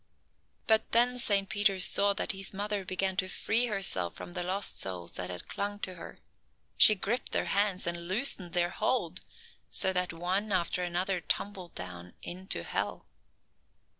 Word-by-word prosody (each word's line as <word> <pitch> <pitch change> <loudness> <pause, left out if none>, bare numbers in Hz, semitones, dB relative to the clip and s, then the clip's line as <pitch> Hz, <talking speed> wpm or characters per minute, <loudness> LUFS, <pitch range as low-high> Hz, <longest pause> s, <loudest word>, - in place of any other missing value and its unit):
But 220 -1 +2
then 245 +2 +4
Saint 200 -4 +2
Peter 205 -1 +1
saw 200 +2 +4
that 200 - -1
his 195 0 -5
mother 205 0 -2
began 190 +1 -1
to 185 - +1
free 230 +6 +1
herself 185 - -1
from 175 - -9
the 180 - -3
lost 190 +3 0
souls 90 -2 -2
that 90 -1 -5
had 90 -1 -7
clung 205 0 -3
to 185 - -3
her. 170 - -11 0.6
She 215 - +9
gripped 215 +5 -3
their - - +1
hands 200 -2 +1
and 170 0 -3
loosened 190 -4 +1
their 175 0 +1
hold, 180 -9 -1 0.5
so 190 - +5
that 180 -1 0
one 185 +5 -2
after 180 -1 0
another 180 +2 -1
tumbled 185 +1 -4
down 90 -1 -8
into 185 +2 -4
hell. - - -3
190 Hz, 165 wpm, -30 LUFS, 175-205 Hz, 0.6 s, She